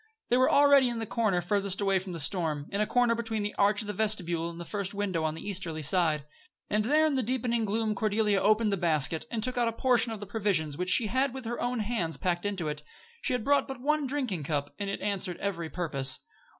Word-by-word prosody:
They 245 - +3
were 255 - +4
already 280 -2 +5
in 240 - -3
the 225 - -3
corner 215 -5 0
farthest 200 +1 0
away 195 -2 +2
from 185 0 -8
the 170 - -5
storm 155 -2 0
in 200 - -1
a 210 - +1
corner 245 -1 +2
between 225 -2 -2
the 205 - -3
arch 205 +1 +2
of 215 - -5
the 210 - -3
vestibule 175 -7 0
and 170 0 -9
the 170 - -6
first 200 +1 -2
window 190 -5 -1
on 155 0 -1
the 165 - -9
easterly 175 -6 -1
side. 155 -2 +2 0.5
And 210 0 +1
there 305 +5 +3
in 310 - +1
the 265 - +1
deepening 235 -1 -1
gloom 215 +1 -1
Cordelia 210 -1 +1
opened 215 +1 +3
the 200 - 0
basket, 160 - +1
and 225 -3 -3
took 250 0 +1
out 240 - +2
a - - 0
portion 240 -1 +2
of 220 - -6
the 205 - -7
provisions 195 -8 0
she 225 +5 +5
had 260 +4 0
with 260 -2 -7
her 240 +1 -4
own 245 -1 -1
hands 200 -7 -2
packed 175 +1 -1
into 190 -6 -3
it. 150 0 -4 0.4
She - - 0
had 250 -3 -1
brought 285 +3 +2
but 265 -2 -7
one 295 +2 0
drinking 255 - -2
cup, 145 -1 -2
but 200 - -3
it 195 - -4
answered 190 -3 -1
every 170 -5 -4
purpose. 140 -5 -1
205 Hz, 240 wpm, -28 LUFS, 175-235 Hz, 0.5 s, already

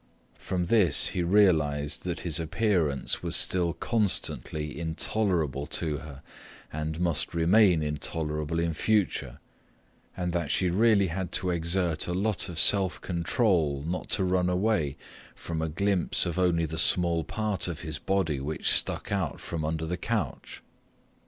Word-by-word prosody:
From 90 -2 -2
this 100 -1 +4
he 90 - -2
realized 80 -7 +2
that 90 -1 -3
his 80 -3 -1
appearance 85 -4 0
was - - -1
still 85 -2 +4
constantly 85 -6 -1
intolerable 80 -4 -1
to 80 -1 -1
her 70 -2 -11 0.5
and 80 +1 -4
must 85 -1 -1
remain 90 0 +4
intolerable 75 +1 -3
in 85 -1 -1
future, 105 +5 -1 0.8
and 90 -1 -2
that 85 -4 -2
she 90 +1 +1
really 100 -1 +3
had 90 +1 -4
to 90 - 0
exert 85 -1 0
a 90 - -2
lot 100 0 -1
of 85 - -7
self 95 -1 +4
control 85 - 0
not 90 +3 -4
to 95 - +1
run 90 -1 +1
away 90 -7 0 0.4
from 80 -1 -5
a 80 - -2
glimpse 95 +2 0
of 85 +1 -3
only 85 -2 +2
the 80 +1 -3
small 85 -2 +3
part 105 +2 -2
of 85 -1 -5
his 80 -3 -5
body 95 -7 -1
which 70 +1 -1
stuck - - +3
out 95 -7 -2
from 80 -2 -5
under 80 +1 -2
the 90 +2 -3
couch. 110 +3 -4
85 Hz, 150 wpm, -27 LUFS, 80-95 Hz, 0.8 s, this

